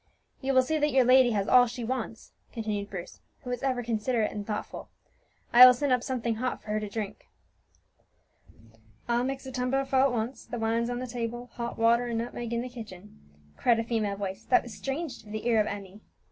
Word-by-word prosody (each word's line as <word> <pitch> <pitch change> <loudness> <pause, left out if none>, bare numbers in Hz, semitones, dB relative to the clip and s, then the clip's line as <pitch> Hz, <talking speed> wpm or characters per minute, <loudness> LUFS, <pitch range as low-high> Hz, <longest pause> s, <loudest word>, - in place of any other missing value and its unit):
"You 270 0 0
will 260 - +6
see 310 +4 -1
that 295 0 +2
your 260 0 +5
lady 255 0 +6
has 200 -1 0
all 250 -1 +7
that - - -5
she 245 0 -6
wants," 230 -2 -4 0.2
continued 210 -3 -3
Bruce, 185 -3 -8 0.2
who 250 - -5
was 245 - -3
ever 255 -3 -1
considerate 225 0 0
and 205 -1 -6
thoughtful. 210 -1 -5 0.6
"I 245 +1 +10
will 250 0 +10
send 280 +2 -1
up 250 - +2
something 240 -3 -2
hot 255 +2 -2
for - - -15
her 215 - +1
to 210 -1 -5
drink." 210 -1 -6 1.8
"I'll 240 0 +1
mix 270 +1 -3
a 265 - -6
tumblerful 265 +1 0
at 275 0 +4
once. 235 +2 -3
The 240 - -5
wine's 230 +1 0
on 245 - -2
the 255 - -4
table 240 0 -5
hot 235 0 -5
water 235 +2 +3
and 235 -1 -2
nutmeg 235 0 -4
in 235 0 -1
the - - -5
kitchen," 200 - -11 0.4
cried 235 -2 +3
a 230 - 0
female 220 -3 -1
voice 195 +1 -5
that 370 - +4
was 240 - -9
strange 270 +5 -4
to 215 - -16
the 215 +1 -5
ear 225 -2 +4
of 210 - -1
Emmie. 200 0 -7
235 Hz, 215 wpm, -28 LUFS, 220-255 Hz, 1.8 s, I